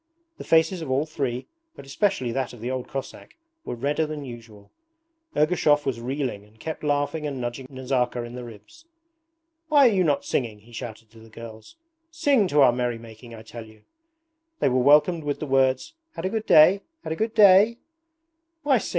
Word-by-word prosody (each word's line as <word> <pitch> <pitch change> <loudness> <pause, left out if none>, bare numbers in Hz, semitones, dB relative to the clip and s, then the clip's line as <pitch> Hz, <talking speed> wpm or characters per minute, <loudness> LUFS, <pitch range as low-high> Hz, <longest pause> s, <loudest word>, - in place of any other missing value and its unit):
The - - -6
faces 165 +2 +2
of 160 - -6
all 135 +3 +1
three, 135 -5 -3 0.3
but - - -12
especially 135 - -1
that 130 +1 -3
of 120 - -12
the 120 +3 -4
old 130 -1 -4
Cossack, 135 -1 -8 0.3
were - - -5
redder 145 +6 -1
than 150 -2 -6
usual. 115 -5 -12 0.7
Ergushov 150 -2 +3
was 125 -4 -2
reeling 125 -4 -3
and 105 +2 -23
kept 160 +4 -6
laughing 145 +1 -1
and 140 -3 -5
nudging 120 +2 -5
Nazarka 130 -2 -2
in 120 0 -9
the 125 0 -7
ribs. 115 - -14 0.8
'Why 290 -4 +6
are - - +3
you 185 -2 +2
not 145 -4 0
singing?' 110 -5 -2
he 115 +3 -19
shouted 115 -2 -9
to 115 - -16
the 115 0 -16
girls. 110 - -12 0.3
'Sing 285 - +2
to 150 -3 +3
our 130 -3 +7
merry 120 -1 -2
making, 115 +1 -12
I 110 - -11
tell 115 0 -10
you!' 110 -1 -19 0.8
They - - +2
were 130 0 +1
welcomed 150 +5 +4
with 145 -1 -3
the - - -4
words, 135 - +1 0.2
'Had 165 - -5
a - - +1
good 220 +1 -3
day? 180 +6 +6 0.2
Had 160 - -3
a - - -5
good 220 +5 -2
day?' 205 +2 +6 0.9
'Why 275 -4 +3
sing? - - -6
135 Hz, 195 wpm, -24 LUFS, 120-160 Hz, 0.9 s, our